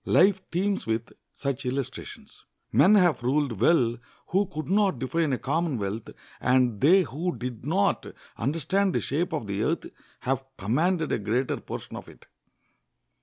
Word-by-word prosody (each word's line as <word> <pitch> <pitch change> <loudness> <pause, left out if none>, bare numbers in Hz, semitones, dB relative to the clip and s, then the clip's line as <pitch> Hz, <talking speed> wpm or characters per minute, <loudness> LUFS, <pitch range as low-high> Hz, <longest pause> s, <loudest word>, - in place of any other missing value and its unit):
Life 190 +1 +4
teems 195 - -1
with 115 +1 -2 0.2
such 140 -2 -3
illustrations. 130 0 -5 0.3
Men 205 +4 +6
have 180 -9 +4
ruled 130 -4 0
well 120 -6 +3 0.3
who 195 +3 +2
could 155 -1 -6
not 195 -5 +2
define 140 +5 0
a 130 - +1
commonwealth; 130 - -2 0.3
and 125 -4 +2
they 185 +7 +6
who 165 +6 -3
did 125 -2 -6
not 195 +5 +1 0.3
understand 165 - 0
the - - +3
shape 170 +6 -1
of 150 -8 -2
the 100 0 -2
earth 160 +9 0 0.4
have 135 +1 -1
commanded 160 - +1
a - - +1
greater 120 +6 0
portion - - -7
of - - -8
it. - - -17
145 Hz, 150 wpm, -27 LUFS, 120-175 Hz, 0.4 s, Men